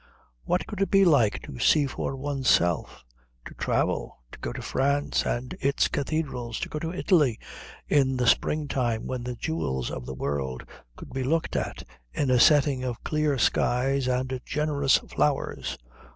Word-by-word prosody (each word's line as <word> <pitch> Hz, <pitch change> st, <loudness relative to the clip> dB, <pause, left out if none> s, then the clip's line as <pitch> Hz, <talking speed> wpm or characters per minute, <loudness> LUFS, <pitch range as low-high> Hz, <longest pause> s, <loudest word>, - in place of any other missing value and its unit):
What 180 Hz, -, 0 dB
could 205 Hz, -3 st, -6 dB
it 195 Hz, -, +2 dB
be 195 Hz, -1 st, +5 dB
like 135 Hz, -, +3 dB
to 65 Hz, -, -9 dB
see 150 Hz, -2 st, +4 dB
for 135 Hz, 0 st, -3 dB
oneself, 130 Hz, -, 0 dB, 0.4 s
to -, -, -9 dB
travel, -, -, -1 dB
to -, -, -11 dB
go -, -, -4 dB
to -, -, -6 dB
France 140 Hz, +2 st, 0 dB
and 125 Hz, +2 st, -3 dB
its 140 Hz, +1 st, +2 dB
cathedrals, 135 Hz, -6 st, -2 dB
to -, -, -3 dB
go 150 Hz, -, -4 dB
to 165 Hz, +1 st, -3 dB
Italy 160 Hz, -, +2 dB, 0.5 s
in 135 Hz, -3 st, +2 dB
the 125 Hz, -, +1 dB
spring 150 Hz, +5 st, +2 dB
time 120 Hz, -5 st, -1 dB
when 130 Hz, -1 st, -3 dB
the 125 Hz, 0 st, -4 dB
jewels 65 Hz, -, -2 dB
of 60 Hz, -, -6 dB
the 65 Hz, -, -5 dB
world 65 Hz, -2 st, -3 dB, 0.3 s
could -, -, -11 dB
be 130 Hz, 0 st, -2 dB
looked 160 Hz, +5 st, 0 dB
at -, -, -3 dB, 0.3 s
in 140 Hz, -3 st, 0 dB
a 125 Hz, -, +4 dB
setting 140 Hz, -1 st, +4 dB
of 125 Hz, -3 st, -4 dB
clear 150 Hz, -2 st, 0 dB
skies 130 Hz, +2 st, +1 dB
and 130 Hz, 0 st, -1 dB
generous 145 Hz, -3 st, +2 dB
flowers? -, -, -1 dB
135 Hz, 165 wpm, -26 LUFS, 120-150 Hz, 0.5 s, be